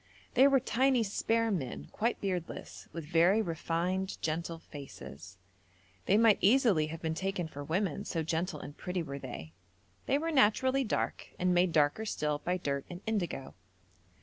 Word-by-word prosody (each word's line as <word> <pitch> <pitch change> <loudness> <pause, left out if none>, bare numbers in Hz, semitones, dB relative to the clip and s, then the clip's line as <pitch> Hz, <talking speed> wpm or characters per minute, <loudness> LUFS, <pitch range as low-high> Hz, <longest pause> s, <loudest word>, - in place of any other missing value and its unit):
They 265 +3 +7
were 275 -1 +5
tiny 255 0 +2
spare 225 +2 +1
men, 140 -11 -3
quite 230 +2 0
beardless, 180 -4 -4
with 165 -2 -6
very 170 +6 +4
refined, 180 +1 -1
gentle 165 +1 -2
faces; 90 - -10 0.7
they 200 - +5
might 225 -2 +5
easily 205 - +4
have 160 +1 -7
been 160 0 0
taken 185 0 -2
for 145 -2 -7
women, 165 +1 -1
so 165 - -2
gentle 165 +1 -2
and 145 - -9
pretty 180 -1 -3
were 140 -2 -6
they. 120 -12 -8 0.5
They 275 - +3
were 325 +3 -1
naturally 260 +1 +4
dark, 225 - -2
and 180 0 +2
made 175 0 +3
darker 155 +7 +2
still 150 -7 -1
by 180 +4 -1
dirt 140 -5 -2
and 175 0 -7
indigo. 180 -11 -2
180 Hz, 160 wpm, -31 LUFS, 155-215 Hz, 0.7 s, They